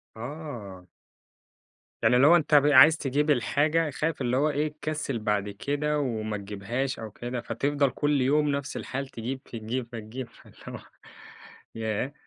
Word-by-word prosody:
آه. 115 - -8 1.2
يعني 125 - +5
اللي 135 +3 +6
هو 170 - +8
أنت 155 -2 +3
ب 145 0 +6
عايز 150 +2 +7
تجيب 145 +1 0
الحاجة 150 +5 +2
خايف 150 +1 -2
اللي 125 +1 +1
هو 150 +2 +3
إيه 150 +1 0
تكسل 150 -5 -3
بعد 105 -2 -1
كده 145 +8 -1
وما 110 -5 -2
تجيبهاش 105 +7 -3
أو 110 -1 -7
كده، 120 +3 -5
فتفضل 140 +5 0
كل 145 +1 +1
يوم 145 +3 +2
نفس 140 -1 -2
الحال، 135 +1 -4
تجيب 130 +2 -6
تجيب 115 +2 -4
فتجيب، 115 +2 -7
فاللي - - -19
هو - - -6 1.0
ياه! 110 +5 -2
130 Hz, 150 wpm, -27 LUFS, 115-145 Hz, 1.2 s, هو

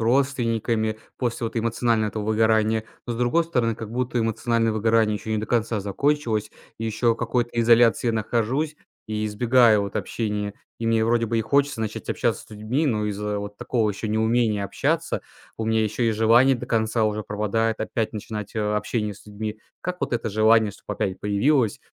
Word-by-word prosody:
родственниками 115 -3 +1 0.2
после 120 -2 -2
вот 115 - -7
эмоционального 115 -1 +1
этого 105 0 -4
выгорания. 110 0 +2 0.2
Но 120 - -2
с - - -5
другой 125 +8 +2
стороны, 120 -8 0
как 110 -1 -7
будто 125 0 -1
эмоциональное 115 0 +1
выгорание 110 0 +2
еще 110 - -7
не 110 - +1
до 110 - -3
конца 115 -2 0
закончилось. 110 +1 0 0.3
И 115 - -4
еще 115 +1 +1
в - - -14
какой-то 120 0 -1
изоляции 115 +1 +4
я 115 - +2
нахожусь 120 +7 -1 0.3
и 110 0 -2
избегаю 115 0 +4
вот 100 - -5
общения. 105 -2 -2 0.3
И 115 - -2
мне 115 -1 +3
вроде 115 0 +2
бы 115 +1 0
и - - +2
хочется 140 +2 +1
начать 110 -1 -4
общаться - - 0
с - - -23
людьми, 110 +9 -1
но 105 -5 0
из-за 105 0 -2
вот 100 0 -7
такого 115 -4 0
еще 105 +2 -5
неумения 110 -1 +1
общаться, - - -1 0.4
у 110 - -3
меня 110 0 +2
ещё 110 +3 -2
и 115 - +3
желание 115 +4 +4
до - - -7
конца 110 0 +1
уже 105 0 -1
пропадает 105 +2 -1
опять 115 -1 -2
начинать, 105 0 -6
э, - - +1
общение 105 0 -1
с 95 - -17
людьми. 105 +1 -6 0.2
Как 180 0 -4
вот - - -2
это 115 - -1
желание 110 0 +4
чтоб 105 - -12
опять 100 -2 -2
появилось? 110 +3 +2
110 Hz, 190 wpm, -24 LUFS, 105-120 Hz, 0.4 s, изоляции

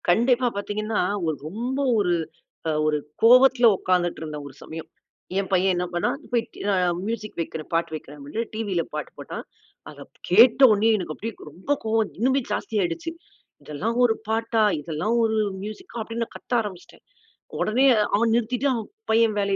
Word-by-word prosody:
கண்டிப்பா 240 +6 +3
பார்த்தீங்கன்னா, 210 +2 -2 0.2
ஒரு 160 -1 0
ரொம்ப 240 - -3 0.2
ஒரு 180 -4 +2 0.7
ஒரு 155 -1 +2 0.2
கோவத்தில 250 +1 +7
உட்கார்ந்துட்டு 180 -2 0
இருந்த, 155 -1 -5
ஒரு 135 - -12
சமயம். 160 0 -8 0.5
என் 195 - -3
பையன் 185 +1 +3
என்ன 180 0 -1
பண்ணான்? 175 +8 0
போய்ட்டு 235 -2 -2
நான் 180 -3 +1
மியூசிக் 215 -1 -4
வைக்கிறேன். 160 -1 -6
பாட்டு 165 -1 0
வைக்கிறேன் 150 -1 -9
அப்படீனு, 145 +11 -4
டிவியில 205 -6 -1
பாட்டு 150 -1 -5
போட்டான். - - -7 0.4
அத - - -12 0.3
கேட்ட 225 +8 +6
உடனேயே 220 +2 +4
எனக்கு 175 -5 -4
அப்படியே 225 +1 -5 0.2
ரொம்ப 190 - -1
கோவம், 220 -1 +1
இன்னுமே 260 +4 +3
ஜாஸ்தி 225 - -3
ஆயிடுச்சு. 185 - -2 0.5
"இதெல்லாம் 210 +11 -3
ஒரு 230 -2 +4
பாட்டா? 225 0 0 0.2
இதெல்லாம் 160 +9 -2
ஒரு 220 -1 +1 0.3
மியூசிக்கா?" 215 - -8
அப்டீன்னு 230 +1 -3
நான் - - -20
கத்த - - -8
ஆரம்பிச்சுட்டேன். 195 -5 -9 0.6
உடனே 245 +5 +2 0.3
அவன் 230 +2 +2
நிறுத்திட்டு 245 +4 0
அவன் 225 -3 -4 0.2
பையன் 225 -1 +3
வேலை 200 -1 +1
215 Hz, 155 wpm, -24 LUFS, 175-230 Hz, 0.7 s, கோவத்தில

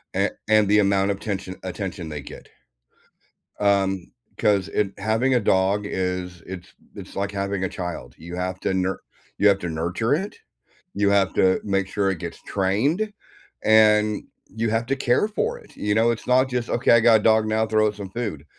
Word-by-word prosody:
a - - +2 0.2
and 110 -1 +4
the 105 +1 +4
amount 100 -1 +2
of 100 - -4
tention 95 -3 -4
attention 95 -1 -5
they 75 -1 -5
get - - -11 1.1
um, 95 -2 +1 0.3
'cause 100 -3 +2
it 100 -2 0
having 110 +6 +1
a - - +4
dog 100 0 +1
is 90 -2 -3
it's 90 -2 -9 0.2
it's - - -10
like 100 +1 -2
having 100 -1 -2
a 95 - -1
child: 85 -9 -6
you 85 +2 -8
have 90 +1 -3
to - - 0
nur 95 0 -1 0.4
you 105 - +4
have 100 -1 +4
to 90 - -4
nurture 85 - -1
it, 195 +6 -4 0.6
you 100 -1 +2
have 100 -1 +2
to 95 0 +3
make 100 -2 0
sure 100 0 0
it 90 - -5
gets 85 0 -7
trained, 135 - 0 0.5
and 105 -1 +4 0.3
you 115 0 0
have 115 +2 0
to 135 - +1
care 130 +7 +2
for 465 - -2
it, 475 - -19
you 105 0 -1
know? 115 +2 +4
It's 115 - -5
not 130 +1 +3
just, 125 -2 -2
"Okay, 120 - +2
I 115 - +7
got 115 -1 +5
a - - -11
dog 110 -1 +4
now, 110 +1 +1
throw 110 0 +2
it 105 - -3
some 100 -2 -7
food." 105 -10 -4
100 Hz, 195 wpm, -23 LUFS, 95-110 Hz, 1.1 s, I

